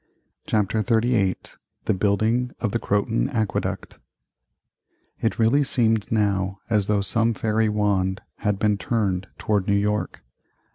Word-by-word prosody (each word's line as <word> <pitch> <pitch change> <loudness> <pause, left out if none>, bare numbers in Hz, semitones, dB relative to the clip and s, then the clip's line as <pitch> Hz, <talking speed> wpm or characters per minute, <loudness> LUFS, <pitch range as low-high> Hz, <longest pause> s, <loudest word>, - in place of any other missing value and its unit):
CHAPTER 105 0 +1
XXXVIII 110 -4 +2 0.5
THE - - +2
BUILDING 110 +6 +1
of 110 - -1
the 115 - 0
CROTON 100 - 0
AQUEDUCT 110 -3 -2 1.2
It 110 - 0
really 115 +6 +3
seemed 115 -5 +1
now 100 -3 +1
as 105 -3 +2
though 105 -1 +2
some 115 +3 +1
fairy 110 0 +1
wand 100 -3 0 0.2
had 105 -1 -1
been 105 0 +1
turned 100 -7 -1
toward 105 -3 0
New 100 - +3
York. 105 +1 -1
105 Hz, 130 wpm, -23 LUFS, 100-115 Hz, 1.2 s, really